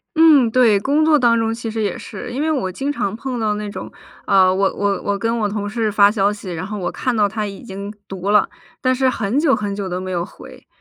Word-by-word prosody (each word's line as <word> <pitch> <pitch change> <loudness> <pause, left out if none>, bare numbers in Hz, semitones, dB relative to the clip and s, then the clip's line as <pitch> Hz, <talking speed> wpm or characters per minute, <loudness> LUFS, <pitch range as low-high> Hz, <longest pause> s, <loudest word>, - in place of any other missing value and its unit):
嗯， 305 -7 +6
对。 225 -5 +4
工 290 +8 +1
作 310 -1 +5
当 235 -3 +3
中 225 0 0
其 230 -1 -5
实 220 0 -3
也 210 +4 -1
是。 235 +2 -8
因 265 +4 -3
为 315 +1 +1
我 220 -11 -1
经 275 +9 -3
常 205 -7 -2
碰 250 0 -4
到 210 -1 0
那 210 0 -4
种， - - -7 0.3
呃， 190 -2 +4
我 195 +1 +1
我 200 -1 -1
我 200 0 -1
跟 230 +2 -1
我 210 -1 0
同 205 0 -3
事 220 0 -1
发 205 0 +5
消 205 -1 +2
息， 205 -3 -7
然 165 +3 -4
后 210 0 -5
我 175 -2 -3
看 255 -2 -2
到 210 -2 +3
他 215 +1 -3
已 195 - -9
经 200 -1 -7 0.2
读 195 +1 -5
了， 210 -1 +4 0.3
但 255 0 +2
是 260 0 +2
很 230 +3 -1
久 300 -4 +3
很 205 -1 -3
久 195 -2 -4
都 180 +1 -3
没 185 0 -5
有 175 -1 -1
回。 - - -13
210 Hz, 280 characters per minute, -19 LUFS, 200-245 Hz, 0.3 s, 嗯